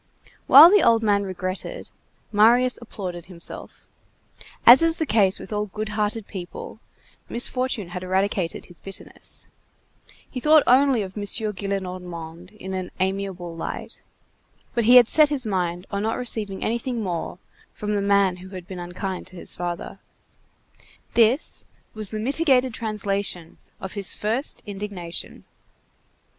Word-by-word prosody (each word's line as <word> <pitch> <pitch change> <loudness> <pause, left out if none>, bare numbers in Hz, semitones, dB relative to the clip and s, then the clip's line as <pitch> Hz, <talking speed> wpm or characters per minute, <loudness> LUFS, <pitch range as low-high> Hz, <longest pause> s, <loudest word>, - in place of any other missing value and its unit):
While 315 +6 +10
the 415 - +6
old 230 -1 +4
man 205 -2 +3
regretted, 185 - -5 0.4
Marius 240 +4 +4
applauded 180 -7 -6
himself. 175 -2 -9 0.8
As 245 +6 +10
is 330 0 +2
the 320 - -1
case 205 -7 +3
with 215 - -8
all 210 0 -1
good 215 +2 -5
hearted 210 0 -2
people, 185 -4 -8 0.5
misfortune 240 -5 0
had 180 +1 -6
eradicated 185 -1 -1
his 175 -3 -17
bitterness. 195 -1 -8 0.8
He 255 - -6
only 305 0 +6 0.4
thought 195 - -3
of 185 - -17
M. 205 - -4 0.3
Gillenormand 180 -3 -5
in 190 -1 -7
an 185 -1 -4
amiable 190 -2 -3
light, 165 - -6 0.7
but 235 -2 0
he 245 +3 +7
had 245 -2 +9
set 305 +2 +5
his 280 -4 -1
mind 180 -3 -2
on 200 0 -2
not 220 +2 -1
receiving 215 -5 -2
anything 235 0 -2
more 175 -2 -4 0.3
from 210 0 -4
the 205 - 0
man 200 -2 +3
who 185 +1 -11
had 180 -1 -8
been 190 -3 -7
unkind 180 +2 -5
to 185 - -13
his 175 - -8
father. 175 -1 -5 1.1
This 235 +5 +2 0.3
was 215 -2 -4
the 215 - -5
mitigated 260 +1 +2
translation 200 -6 -3 0.2
of 190 - -7
his 200 -3 0
first 230 +7 -1
indignation. 195 -4 -7
200 Hz, 140 wpm, -23 LUFS, 185-230 Hz, 1.1 s, While